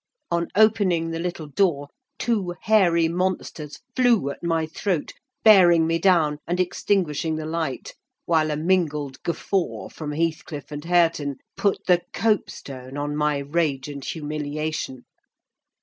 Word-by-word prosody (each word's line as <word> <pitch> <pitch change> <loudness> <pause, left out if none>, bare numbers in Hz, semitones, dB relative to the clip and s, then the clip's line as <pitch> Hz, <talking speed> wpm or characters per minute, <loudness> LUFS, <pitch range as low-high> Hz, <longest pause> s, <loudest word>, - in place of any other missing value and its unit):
On 170 0 +1
opening 195 -6 +3
the 165 - -3
little 170 -2 -4
door, 145 -2 +1 0.3
two 200 -7 -1
hairy 175 -7 +4
monsters 170 -4 -3
flew 240 - +3
at - - -10
my 165 -1 +1
throat, 165 0 -2 0.3
bearing 175 -6 +7
me 165 +1 +1
down, 160 -5 +3
and 175 +2 -1
extinguishing 170 -4 0
the 155 0 -4
light; 160 -4 -3 0.3
while 160 -2 +2
a 150 - -1
mingled 150 -5 0
guffaw 180 +2 -2
from 150 -2 -6
Heathcliff 155 -2 -3
and 145 0 -6
Hareton 165 -5 +2 0.2
put 200 - 0
the 175 -1 +4
copestone 140 - -2
on 145 0 -2
my 150 -1 +1
rage 140 -1 -1
and 140 -2 -7
humiliation. 150 -3 -4
165 Hz, 135 wpm, -24 LUFS, 150-180 Hz, 0.3 s, bearing